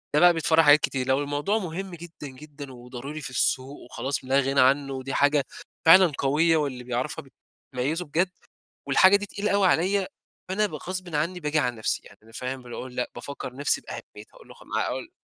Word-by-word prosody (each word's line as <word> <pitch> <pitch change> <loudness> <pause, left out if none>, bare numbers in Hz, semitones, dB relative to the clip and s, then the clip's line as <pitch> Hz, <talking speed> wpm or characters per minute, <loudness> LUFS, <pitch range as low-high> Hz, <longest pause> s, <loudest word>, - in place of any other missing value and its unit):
ده 150 - +5
بقى 175 0 +7
بيتفرع 165 0 +3
حاجات 145 0 +7
كتير، 130 -3 -2
لو 135 +1 +3
الموضوع 145 +9 -1
مهم 185 -1 -5
جدًا، 165 -3 -10
جدًا 140 0 -11
وضروري 125 +5 -8
في - - -6
السوق 130 +2 0
وخلاص 135 +2 -4
لا 135 +2 +3
غنى 135 0 +1
عنه 135 +1 +3
و 130 - -5
دي 135 +1 -5
حاجة 145 0 +3 0.4
فعلًا 180 0 +8
قوية، 160 +4 +3
واللي 130 -5 -2
بيعرفها 125 +4 -3 0.5
بتميّزه 150 +8 -1
بجد 170 +5 0 0.6
والحاجة 185 +8 +6
دي 205 0 -4
تقيلة 205 +1 -3
أوي 200 -2 +4
عليَّا؛ 190 +3 +2 0.4
فأنا 210 +3 +2
ب - - -9
غصبًا 180 -3 -5
عني 180 +4 -2
باجي 150 0 0
على 125 -4 0
نفسي 110 - -1
يعني - - -16
أنا 115 +1 -19
فاهم 130 +1 -5
باجي 120 -1 -9
أقول 125 -1 -7
لأ، 125 - -2
بافكر 140 -3 -7
نفسي 145 - +1
بأهميتها - - -11
أقول - - -17
لا - - -12
خ - - -18
ما - - -2
أقول 340 - -5
145 Hz, 205 wpm, -26 LUFS, 130-175 Hz, 0.6 s, فعلًا